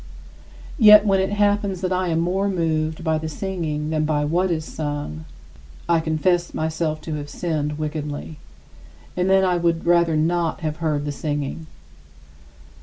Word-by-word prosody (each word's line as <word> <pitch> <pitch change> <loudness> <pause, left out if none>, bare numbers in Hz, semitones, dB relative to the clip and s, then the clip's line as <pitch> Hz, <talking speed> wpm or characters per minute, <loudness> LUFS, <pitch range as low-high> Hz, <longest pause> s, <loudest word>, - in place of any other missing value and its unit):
Yet 210 -2 +8
when 195 -2 +3
it 190 - +1
happens 205 -2 +1
that 185 -1 -1
I 185 0 0
am 165 -1 0
more 190 +4 0
moved 160 -3 -1
by 160 -1 +1
the 160 0 -4
singing 155 -4 -3
than 155 -1 +1
by 150 -1 0
what 175 +5 +1
is 160 -2 -2
sung, 145 - -5 0.6
I 170 -1 +3
confess 170 +2 0
myself 155 -1 -2
to 155 0 -5
have 145 0 -7
sinned 150 -4 -2
wickedly, 150 0 -5 0.8
and 180 +1 0
then 190 0 +4
I 180 -1 +2
would 170 -1 0
rather 170 -2 +3
not 165 +2 0
have 155 -1 -3
heard 155 -3 -1
the 145 - -2
singing. 145 +2 -4
160 Hz, 160 wpm, -22 LUFS, 155-180 Hz, 0.8 s, Yet